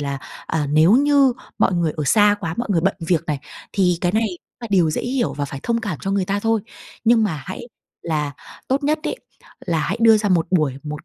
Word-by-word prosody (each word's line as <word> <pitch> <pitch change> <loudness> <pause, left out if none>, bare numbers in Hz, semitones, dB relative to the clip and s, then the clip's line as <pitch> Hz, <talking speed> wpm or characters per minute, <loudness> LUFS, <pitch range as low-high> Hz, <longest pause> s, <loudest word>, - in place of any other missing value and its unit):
là, 140 -1 -3 0.3
à, 155 -2 -1
nếu 155 +5 +5
như 280 +1 +4 0.3
mọi - - +3
người 170 -3 0
ở 155 - -2
xa 205 +7 +4
quá, 165 -4 -3
mọi 240 0 -3
người 175 -4 +2
bận 195 +4 +1
việc 170 -1 +1
này, 150 -3 -1 0.3
thì 180 -3 +2
cái 175 0 0
này 225 +1 +2
cũng 180 -3 -13
là 235 - -5
điều 180 -5 +3
dễ - - -2
hiểu 245 -1 -1
và 145 - -2
phải 140 -1 -7
thông 230 -1 0
cảm 205 - -4
cho 195 - -3
người 195 -1 +1
ta 200 +2 -1
thôi. 225 0 +1 0.4
Nhưng 225 -1 +4
mà 155 -9 -3
hãy 185 - -6 0.4
là 150 -3 -2 0.4
tốt 275 +2 0
nhất 305 +2 +1
ấy, - - -3 0.5
là 170 -3 +1
hãy 195 - -1
đưa 225 -1 +7
ra 210 -1 0
một 175 -4 +2
buổi, 155 -8 +2
một 150 -1 -7
185 Hz, 240 wpm, -21 LUFS, 160-225 Hz, 0.5 s, đưa